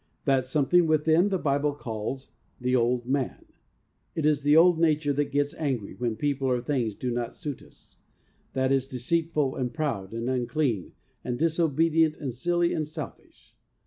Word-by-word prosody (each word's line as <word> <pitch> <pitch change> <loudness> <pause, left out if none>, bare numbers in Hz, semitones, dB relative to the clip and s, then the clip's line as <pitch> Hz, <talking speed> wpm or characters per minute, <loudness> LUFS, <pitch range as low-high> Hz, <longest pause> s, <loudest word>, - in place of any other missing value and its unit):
That 135 -3 +2
some 140 +1 +1
thing 175 +2 +4
within 160 +4 +3
the 190 - +1
Bible 145 -2 0
calls 115 +1 -5
' - - -40
the 125 0 +1
old 120 0 +1
man.' 135 0 -2 0.7
It 160 - -1
is 150 -1 +3
the 145 +2 +4
old 170 0 +6
nature 155 -3 +2
that 145 0 -1
gets 145 0 0
angry 130 -10 -3
when 120 -2 -2
people 140 +2 -1
or 125 -1 +2
things 120 -4 -1
do 125 +3 -3
not 120 0 -3
suit 150 -6 -6
us; - - -21 0.6
that 130 0 +1
is 135 -1 +2
deceitful, 150 +2 0
and 125 -2 -2
proud, 135 - -3
and 115 +1 -4
unclean, 125 - -1 0.3
and 120 -1 -3
dis 165 +3 0
obedient, 160 0 +3
and 135 -5 -4
silly, 175 +6 +1
and 155 -1 -2
selfish. 155 - -10
140 Hz, 175 wpm, -27 LUFS, 125-155 Hz, 0.7 s, old